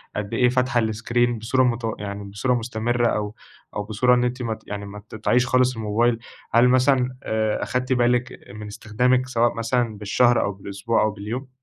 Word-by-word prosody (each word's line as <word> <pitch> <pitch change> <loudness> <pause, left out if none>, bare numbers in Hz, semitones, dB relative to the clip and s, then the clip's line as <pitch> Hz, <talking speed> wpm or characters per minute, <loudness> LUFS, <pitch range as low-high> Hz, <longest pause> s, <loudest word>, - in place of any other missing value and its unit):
قد 105 -1 -4
إيه 125 -1 +3
فاتحة 125 -1 +1
الScreen 115 +2 0
بصورة 130 +4 +2
متو 115 -2 -1
يعني 100 0 -5
بصورة 100 +6 -1
مستمرّة، 120 0 0
أو 105 -1 -2 0.4
أو 105 - -2
بصورة 120 +4 +2
إن 120 - +1
أنتِ 125 +1 -2
مت 115 -2 -4
يعني 100 0 -5
ما 100 +1 -9
تقطعيش 120 +3 +1
خالص 130 0 +2
الموبايل، 115 +2 +1 0.3
هل 120 +2 +6
مثلًا 130 0 +2
آآ 110 -1 -1
أخدتِ 125 +1 -1
بالِك 125 0 +1
من 105 0 -8
استخدامِك 125 +5 0
سواء 120 -1 +2
مثلًا، 115 -1 -1
بالشهر 120 +4 +3
أو 100 - -1
بالأسبوع 100 +3 -2
أو 110 - +1
باليوم؟ 110 +6 -6
115 Hz, 175 wpm, -23 LUFS, 105-125 Hz, 0.4 s, هل